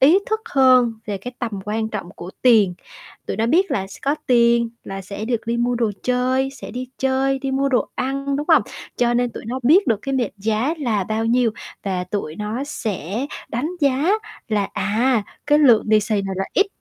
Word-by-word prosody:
ý 310 +9 +7
thức 435 0 -1
hơn 255 -3 +5
về 205 - -2
cái 245 +6 -7
tầm 235 - -2
quan 220 +1 -2
trọng 200 -5 -5
của 175 - -8
tiền, 215 -8 +5 0.5
tụi - - -3
nó 225 +1 +1
biết 365 +10 +3
là 190 -2 -1
s 195 - -11
có 280 +2 +1
tiền 235 -1 +4
là 195 0 -6
sẽ 200 +3 -6
được 235 -1 -2
đi 235 0 0
mua 240 +1 +1
đồ 230 -3 +1
chơi, 255 +2 +1
sẽ 275 - -9
đi 250 +1 -5
chơi, 265 0 +1
đi 270 0 -3
mua 275 +1 +1
đồ 255 - +1
ăn, 275 +1 -2
đúng 295 +1 -3
hông? - - +6 0.3
Cho 240 0 +2
nên 245 0 +1
tụi - - -8
nó 250 +3 -3
biết 335 +11 +5
được 225 -4 +2
cái 275 - -2
mệnh 245 -7 0
giá 220 +9 0
là 220 -9 0
bao 220 +2 -1
nhiêu, 240 0 +3 0.3
và 185 -2 -2
tụi 180 -4 -4
nó 215 +6 -3
sẽ 215 - -3 0.2
đánh 270 +9 -2
giá 280 +5 +2 0.4
là, 205 -3 0
à, 230 +3 +1 0.2
cái 295 0 +5
lượng 245 -7 +5
lì 215 0 +5
xì 215 +1 -1
này 195 -1 -3
là 195 - -1
ít 400 - +3
240 Hz, 215 wpm, -21 LUFS, 215-265 Hz, 0.5 s, ý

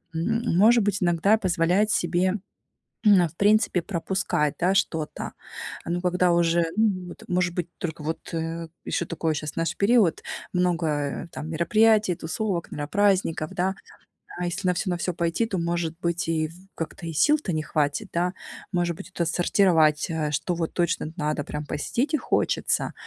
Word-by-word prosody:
М, 225 +5 0
может 230 +5 +6
быть, 195 -2 0
иногда 175 +5 +3
позволять 185 +2 +2
себе, 185 +1 +1 0.7
м, 205 -3 +7
а, - - +2
в 160 - -21
принципе 205 -1 +3
пропускать, 170 -4 -1
да, 185 +3 +2
что-то. 160 -5 -1 0.5
Ну, 175 +1 -2
когда 180 0 +2
уже, 170 0 +3
ну 200 -5 +1
вот - - -11
может 180 -1 0
быть 175 -2 -2
только 160 -3 -4
вот, 160 +2 -4
э, 165 0 -3 0.2
ещё 170 - -1
такое 160 -1 -1
щас, 150 0 -4
знаешь, 165 -1 -1
период, 205 -4 +3 0.3
много 165 -5 0
там 155 - -6
мероприятий, 210 +5 +3
тусовок, 170 +2 -3
наверно, 145 0 -4
праздников, 195 -6 +2
да. 190 0 0 0.7
А 180 - -1
если 185 +2 -3
на 180 - +3
всё 185 +2 -1
на 175 - 0
всё 175 +1 -2
пойти, 170 +6 0
то, 200 - -3
может 170 -1 -1
быть, 170 +2 -1
и 160 -1 0
в - - -13 0.2
как-то 165 +1 -6
и 165 - -4
сил-то 295 - +2
не 155 -1 -1
хватит, 145 -2 -1
да. 180 +2 0 0.4
Может 175 -2 0
быть, - - -10
это 175 -2 -1
сортировать, 165 -4 +3
э, 160 -2 -1
что 150 +4 -1
вот 165 -1 -2
точно 170 -2 0
надо 150 -3 -1
прям 150 +1 -5
посетить 240 - -1
и - - +4
хочется, - - 0
175 Hz, 170 wpm, -25 LUFS, 165-190 Hz, 0.7 s, м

